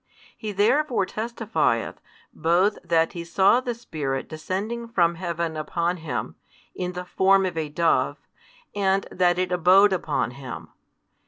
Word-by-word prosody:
He 215 - -5
therefore 225 +2 +2
testifieth, 215 - -1 0.4
both 180 +6 +2
that 165 -1 +1
he 170 - -5
saw 190 +7 +4
the 245 -2 -3
Spirit 145 - -4
descending 200 +9 -4
from 175 -7 +2
Heaven 170 -2 -3
upon 170 +3 -1
Him, 125 -8 -5 0.4
in 180 0 -4
the 180 0 -6
form 195 +2 +3
of 180 -2 -3
a 160 -2 -2
Dove, 165 +2 +1 0.6
and 195 -1 +1
that 180 -1 +2
It 185 0 -1
abode 185 +3 +5
upon 155 -8 -1
Him. 130 -2 -8
180 Hz, 140 wpm, -24 LUFS, 165-200 Hz, 0.6 s, abode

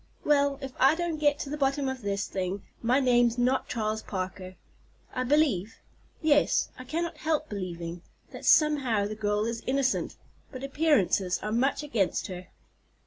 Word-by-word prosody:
Well, 285 -1 +3
if 270 - -5
I 270 +4 +5
don't 340 -2 -2
get 290 -1 +3
to 280 - -5
the 300 - -4
bottom 275 0 +1
of 265 -1 -3
this 200 -1 -2
thing 190 +1 -3 0.2
my 245 +3 +3
name's 240 -2 +3
not 250 +2 +1
Charles 215 -1 -2
Parker. 185 -2 -5 0.6
I 255 - -1
believe—yes, 290 - +1
I 255 - -10
cannot 335 +5 -3
help 310 -1 -1
believing—that 175 -3 -7
somehow 270 -9 +4
the 210 - -5
girl 210 0 0
is 230 0 -3
innocent; 270 0 0 0.4
but 255 -1 -8
appearances 275 - +2
are 210 - -2
much 265 +6 +1
against 230 -10 0
her." 180 -2 -7
250 Hz, 150 wpm, -28 LUFS, 205-285 Hz, 0.6 s, I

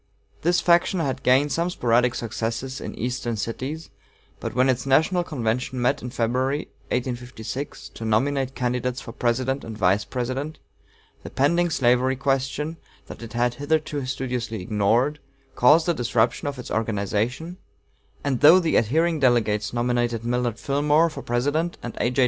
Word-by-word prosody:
This 175 +2 +2
faction 175 +1 +3
had 140 -5 -2
gained 135 +3 +3
some 170 +2 0
sporadic 125 -6 +2
successes 115 +4 -3
in - - -6
Eastern 120 -1 -2
cities, 130 +9 -5 0.5
but - - -5
when 130 +1 +4
its 130 0 0
national 160 +6 +3
convention 125 -3 -2
met 120 - +1
in 125 - -5
February, 130 +4 -1 0.2
1856, 125 +1 -4
to - - -10
nominate 130 +4 0
candidates 125 0 -1
for 115 - -8
President 130 +4 -1
and 110 -2 -7
Vice 95 +1 +2
President, 130 +6 -4 0.6
the - - -8
pending 170 +6 +2
slavery 130 -2 +2
question, 135 +4 -1 0.3
that - - -10
it 115 -1 -9
had 120 0 +1
hitherto 145 +1 -1
studiously 125 -4 -3
ignored, 110 +10 +1 0.3
caused 155 +7 +5
a 175 - +3
disruption 120 -1 0
of 140 -2 -3
its 125 - -8
organization; 110 - -1 0.7
and 135 -4 0
though 155 +5 +8
the 170 -4 +2
adhering 160 +8 +2
delegates 115 -5 +2
nominated 120 -1 0
Millard 120 -1 0
Fillmore 150 +5 +2
for - - -7
President 145 +8 -1
and 120 - -6
A.J. 125 +3 0
125 Hz, 150 wpm, -24 LUFS, 120-145 Hz, 0.7 s, though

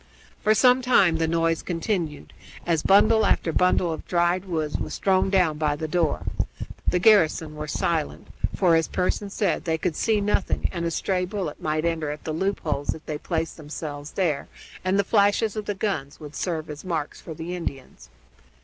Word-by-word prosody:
For 215 +1 +3
some 250 +2 +5
time 195 -10 +4
the 160 0 +1
noise 165 0 +1
continued, 165 -4 -3 0.3
as 165 -3 +1
bundle 215 +3 +5
after 165 - +1
bundle 180 -1 +2
of - - -8
dried 175 +1 +1
wood 160 -5 -2
was 150 - -4
thrown 190 0 +2
down 180 -6 +2
by 150 -2 +1
the 155 +2 -4
door. 165 -1 0 0.6
The 180 - +3
garrison 170 -6 +4
were 150 0 -5
silent; 155 0 -2 0.3
for, 175 -4 +4
as 165 0 +2
Pearson 200 +2 -1
said, 195 -3 -1
they 160 -1 +1
could 160 0 -2
see 220 -2 +1
nothing, 205 -1 0
and 170 -2 -3
a - - +1
stray 180 +2 -1
bullet 185 -5 -4
might 155 +1 -1
enter 165 -3 -1
at 150 0 -6
the 155 - -3
loop 195 +5 -1
holes 145 -2 -1
if 160 - -13
they 150 -1 -4
placed 165 -1 -3
themselves 150 -1 -7
there, 165 -7 0 0.4
and 185 +1 +1
the 200 - +3
flashes 205 +1 +2
of 215 -1 -4
the 205 - -2
guns 190 -9 -3
would 150 -2 -9
serve 160 -3 -3
as 150 - -8
marks 165 -5 -3
for 160 - -8
the 165 +3 -5
Indians. 135 - -7
170 Hz, 190 wpm, -25 LUFS, 155-190 Hz, 0.6 s, some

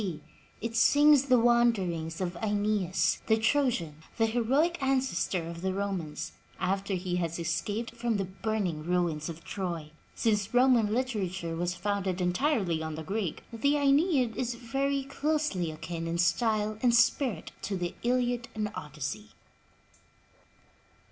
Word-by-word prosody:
D. 180 -7 -3 0.4
It 230 +1 -3
sings 290 +3 +6
the 255 -2 +5
wanderings 200 -9 +2
of 180 -1 -2
Aeneas, 205 -2 0
the 220 - +4
Trojan, 220 - +1 0.2
the 225 - +3
heroic 265 +9 +1
ancestor 260 -9 0
of 170 0 -7
the 190 0 -1
Romans, 195 -6 -3 0.3
after 195 +1 -1
he 180 -1 -2
has 170 -2 -2
escaped 205 +8 -2
from 235 -2 0
the 195 - -1
burning 190 -4 -2
ruins 170 -2 0
of 165 0 -8
Troy. 170 -6 -4 0.2
Since 215 0 0
Roman 245 -4 +5
literature 190 -9 -2
was 175 +1 -1
founded 195 0 -1
entirely 180 - +1
on 160 -1 -4
the 160 - -6
Greek, 195 -1 -3
the 280 +6 +2
Aeneid 280 -3 +3
is 245 -1 -1
very 270 +4 -1
closely 280 - -1
akin 165 +1 -5
in 165 +1 -1
style 215 +4 +1
and 240 -2 +4
spirit 230 - +2
to 195 -1 -2
the 175 -1 -3
Iliad 245 -1 0
and 210 -1 -2
Odyssey. 135 -8 -5
205 Hz, 140 wpm, -29 LUFS, 175-240 Hz, 0.4 s, sings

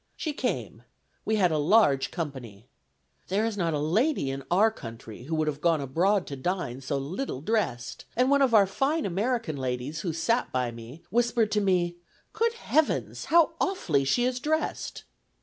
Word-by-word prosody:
She 310 - -3
came; 130 - -3 0.4
we 220 - +1
had 185 -5 +3
a 155 - +1
large 145 -5 +4
company. 130 - -6 0.6
There 200 +4 +1
is 225 -2 -2
not 170 -5 0
a - - -1
lady 175 - +1
in 135 0 -5
our 210 +6 +4
country, 115 - -10
who 160 +3 -2
would 155 0 +1
have 150 -1 -3
gone 165 -2 +3
abroad 175 +9 +1
to 140 - -6
dine 135 -3 -3
so 135 +2 -2
little 145 - -4
dressed; 150 - -2
and 250 +2 +3
one 280 0 +4
of 265 -3 +4
our 205 -2 +7
fine 275 +11 0
American 200 - -1
ladies, 130 +3 -3
who 175 - -2
sat 230 +9 0
by 125 -2 -1
me, 115 +8 -11
whispered 235 -2 +2
to 210 0 +2
me, 175 -3 +1 0.4
'Good 455 +2 +1
Heavens! 315 -9 0
how 335 0 +5
awfully 165 - +1
she 240 - +2
is 250 0 -1
dressed.' 315 +4 -2
175 Hz, 180 wpm, -27 LUFS, 140-230 Hz, 0.6 s, our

